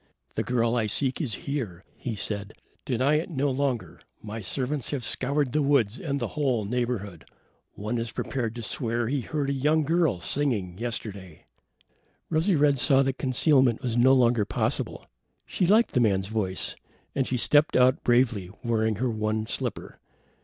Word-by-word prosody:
"The - - -1
girl 120 -1 +1
I 115 -3 +1
seek 130 - 0
is 120 -10 -1
here," 115 -11 -4
he 120 -3 -5
said. 100 0 -4 0.3
"Deny 130 +4 +2
it 160 - -5
no 145 -3 0
longer. 130 -3 -2 0.2
My 110 +1 -7
servants 130 +7 -1
have 135 -5 -3
scoured 140 +2 0
the 150 - +1
woods 135 -6 +2
and 140 -3 -2
the 120 -4 -2
whole 130 -8 0
neighborhood. 110 -6 -3 0.5
One 110 +4 -3
is 115 0 -4
prepared 120 -4 -3
to 120 - -6
swear 115 0 -2
he 140 0 0
heard 140 +2 -2
a - - 0
young 150 +4 +2
girl 160 - +1
singing 100 -6 -1
yesterday." 100 -7 -6 0.9
Rosy 165 +4 +2
red 145 -2 +3
saw 135 +1 +5
that 135 0 -2
concealment 130 -2 +3
was 120 -2 -1
no 125 +2 +5
longer 120 -3 +3
possible. - - -2 0.4
She 180 - 0
liked 220 +5 +4
the 125 - +1
man's 100 -4 +1
voice, 100 -4 -2 0.4
and 135 -2 0
she 125 - -1
stepped 145 +5 +3
out 130 +1 +4
bravely, 120 -6 +2
wearing 110 -2 +1
her 125 +5 -1
one 110 0 -1
slipper. - - -4
125 Hz, 165 wpm, -26 LUFS, 110-140 Hz, 0.9 s, saw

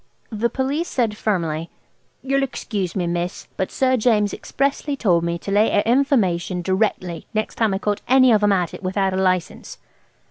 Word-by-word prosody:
The 225 +2 0
Police 280 +7 -1
said 230 -5 -1
firmly, 165 -7 -2 0.5
"you'll 275 +1 +1
excuse 210 -8 -3
me, 180 -3 0
miss, 175 +1 -3
but 190 - -2
Sir 260 -1 +1
James 215 -3 +2
expressly 280 +1 -2
told 180 -10 +2
me 170 0 -1
to 195 - -6
lay 210 +2 +4
a 205 - +2
information 200 -9 +1
directly 185 -2 -1
next 215 - -1
time 225 -3 +1
I 190 - 0
caught 205 +1 -2
any 255 -1 +5
of 215 -2 +4
'em 205 0 +3
at 180 -4 0
it - - -8
without 190 0 0
a - - -1
license." 185 -2 -1
205 Hz, 180 wpm, -21 LUFS, 185-245 Hz, 0.5 s, any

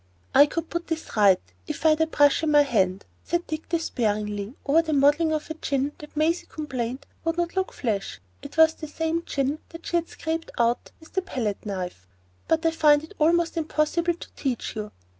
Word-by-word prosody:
"I 285 +1 +8
could 330 +2 -4
put 340 0 -3
this 320 -6 -4
right 200 -4 +6 0.3
if - - -5
I - - +8
had 310 +1 +3
a 320 - +3
brush 290 -2 +4
in 320 - 0
my 295 -1 +6
hand," 195 -8 +1 0.2
said 345 0 -1
Dick, 310 0 -5
despairingly, 210 -8 -1
over 300 +4 +5
the 320 -2 -2
modelling 295 +3 +4
of 310 0 -2
a - - -1
chin 280 -3 -1
that 300 0 -12
Maisie 325 +3 +1
complained 260 -4 -4 0.2
would 330 0 -1
not 345 0 -1
"look 380 0 0
flesh,"—it 145 - -5
was 320 0 +7
the 310 - -8
same 325 +2 -1
chin 280 +2 -1
that 330 0 -11
she 345 - +1
had 335 0 -2
scraped 325 0 -4
out 235 0 +1
with 320 - -17
the 380 - +1
palette 225 - -3
knife,—"but 95 - -4
I 325 - +4
find 300 -2 +4
it 315 - -11
almost 335 +2 +3
impossible 325 +2 +1
to - - -12
teach 260 -5 -3
you. 210 -1 -5
300 Hz, 195 wpm, -25 LUFS, 230-325 Hz, 0.3 s, I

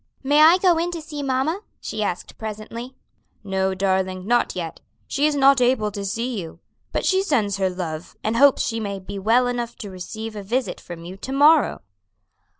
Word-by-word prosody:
"May 290 +3 +4
I 325 +3 +8
go 360 -3 +3
in 340 +1 0
to 335 - -4
see 300 -2 -7
mamma?" 275 +7 0 0.2
she 220 0 -5
asked 180 -4 -4
presently. 225 +4 -6 0.5
"No, 190 -1 0
darling, 190 -1 0
not 240 +2 +1
yet; 170 -3 -5 0.3
she 285 +2 +1
is 300 - 0
not 275 -1 +5
able 245 -4 +2
to 200 0 -5
see 230 +4 -2
you; 165 -2 -10 0.3
but - - -1
she 380 0 +3
sends 220 - +1
her 190 -1 +1
love, 175 -3 -5
and 220 +1 0
hopes 280 +2 +5
she 225 -1 -2
may 200 -2 -3
be 195 +1 -7
well 230 +5 +3
enough 240 -1 -2
to 205 -3 -8
receive 215 +4 -7
a 205 - -5
visit 240 +6 -2
from 170 -1 -9
you 185 +2 -8
to 260 - -7
morrow." 290 +2 +4
225 Hz, 195 wpm, -23 LUFS, 195-275 Hz, 0.5 s, I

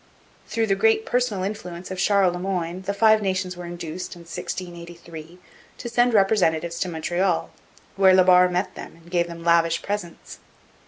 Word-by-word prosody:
Through 230 -1 0
the 200 - +1
great 220 +2 +2
personal 245 -6 0
influence 185 -3 -6
of 185 - -5
Charles 195 -2 +3
Le 180 - -5
Moyne 180 -1 -3
the 200 - 0
Five 220 +1 +4
Nations 185 -2 -2
were 175 0 -8
induced, 175 +1 -6
in 175 - -13
1683, 170 -1 -8 0.4
to - - -7
send 240 0 +2
representatives 170 -5 +2
to 185 - -1
Montreal, 175 +2 -1 0.5
where 190 -1 +6
La 185 - +6
Barre 180 0 +6
met 180 +2 -2
them - - -10
and 170 +1 -19
gave 175 -1 +1
them 170 -1 -9
lavish 165 -1 +2
presents. 200 -5 -6
180 Hz, 170 wpm, -23 LUFS, 170-195 Hz, 0.5 s, where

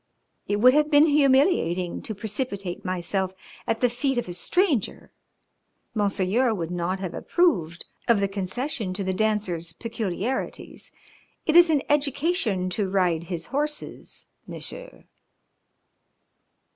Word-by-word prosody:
It 205 - +1
would 250 +5 +6
have 300 +1 +3
been 295 0 +6
humiliating 270 - +2
to 220 - -6
precipitate 200 -3 -4
myself 185 +1 -2 0.3
at 225 0 -1
the 250 - +5
feet 255 +2 -1
of 240 - -1
a 175 - -5
stranger. 290 - 0 0.8
Monseigneur 210 +3 +1
would 170 -3 -4
not 180 +2 -2
have 185 -3 -4
approved 175 - +1 0.2
of 235 -4 +4
the 200 - +1
concession 200 +2 -3
to 195 - -1
The 190 0 -1
Dancer's 185 -5 -1
peculiarities. 225 +3 -4 0.5
It 310 - +1
is 345 -1 +8
an 295 -4 +2
education 285 - +1
to 195 0 -1
ride 180 -4 +1
his 170 -2 -5
horses, 295 +2 -4 0.2
Monsieur." - - -9
210 Hz, 125 wpm, -25 LUFS, 185-275 Hz, 0.8 s, is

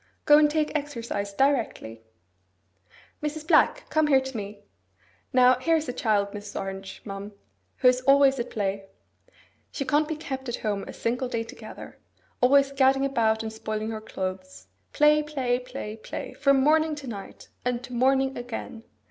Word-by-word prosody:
Go 295 0 +7
and 300 -1 +5
take 305 0 0
exercise 235 -8 -3
directly. 225 - 0 1.2
Mrs. 300 +1 -4
Black, - - +3
come 310 -1 +3
here 275 -2 +5
to 265 -1 -7
me. 205 -1 -6 0.7
Now, 255 -1 +5
here 330 +5 +2
is 315 -1 -1
a 250 - -3
child, 205 -4 +1
Mrs. 205 0 -7
Orange, 195 0 -7
ma'am, 200 0 -7 0.4
who - - +3
is 250 0 +4
always 275 0 +5
at 235 - -3
play. 195 -2 -2 0.9
She 275 - -4
can't 300 +2 +2
be 315 - -3
kept 265 -4 -6
at 240 - -1
home 205 -2 -1
a - - -6
single 245 +3 -2
day 230 -2 -2
together; 230 - -11 0.4
always 275 +2 +5
gadding 270 0 +3
about 225 -5 +1
and 220 0 -5
spoiling 215 0 -4
her 220 -1 -5
clothes. 185 - -6 0.3
Play, 300 0 +4
play, 265 -5 -1
play, 250 -4 -7
play, 220 - -7
from 275 -1 +3
morning 310 +1 +3
to 290 -2 -9
night, 205 -6 -9
and 245 0 -1
to 250 - -9
morning 265 +2 +2
again. 240 -1 -7
250 Hz, 165 wpm, -26 LUFS, 215-280 Hz, 1.2 s, Go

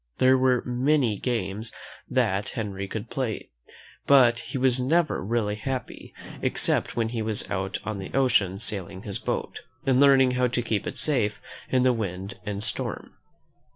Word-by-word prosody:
There 130 +1 +5
were 130 -1 +3
many 125 -3 +1
games 110 -2 -2 0.4
that 95 +2 +1
Henry 100 -3 -3
could 110 +1 -6
play, 125 -6 -3 0.6
but 125 -4 +6
he - - -5
was 130 -1 +3
never 155 - +1
really 105 0 0
happy 130 +4 -5 0.3
except - - +1
when 115 -1 0
he 115 -1 -3
was 110 -1 -2
out 95 0 -2
on 110 -2 -4
the 95 - -7
ocean 110 -8 +3
sailing 95 -2 -4
his 100 -2 -4
boat, - - -3 0.3
and 130 -1 +3
learning 135 -2 +6
how 125 0 +2
to 120 0 -1
keep 110 -3 -1
it - - -5
safe 110 -8 +1 0.3
in 130 -1 +3
the 130 -1 +4
wind 100 -3 -4
and 100 0 -3
storm. 110 - -3
115 Hz, 160 wpm, -26 LUFS, 100-130 Hz, 0.6 s, but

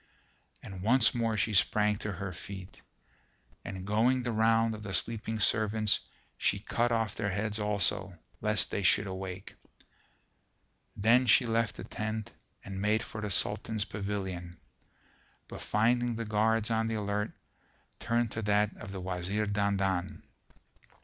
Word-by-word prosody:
And 95 -1 -8
once 115 +4 +5
more 115 -2 0
she 110 - 0
sprang 105 +1 +3
to 105 - -4
her 95 0 -5
feet; 95 +2 -9 0.8
and, 95 -1 -6
going 120 +5 +2
the 120 - -1
round 115 0 +3
of 105 - -8
the 100 -3 -3
sleeping 110 -1 -1
servants, 110 0 +2 0.4
she 100 - +1
cut 120 +4 -1
off 115 -3 0
their 105 -2 -2
heads 105 +3 -2
also, 100 -2 +1 0.2
lest 105 -1 +3
they - - -1
should 100 +1 +3
awake. 95 0 -6 1.4
Then 120 +5 +4
she 120 +3 +5
left 115 -1 0
the - - -8
tent 110 -1 -4 0.3
and 95 -1 -5
made 110 +2 +2
for 110 - -7
the 105 - -3
Sultan's 105 +2 +1
pavilion, 95 -4 -5 0.9
but - - -9
finding 120 +2 +1
the 115 0 -4
guards 110 +1 +1
on 115 0 +1
the 115 - -2
alert, 105 0 -1 0.7
turned 115 -1 0
to 110 - -3
that 105 0 +1
of 105 - -9
the 95 - -6
Wazir 95 +3 -2
Dandan. 100 -3 -1
105 Hz, 145 wpm, -30 LUFS, 100-110 Hz, 1.4 s, once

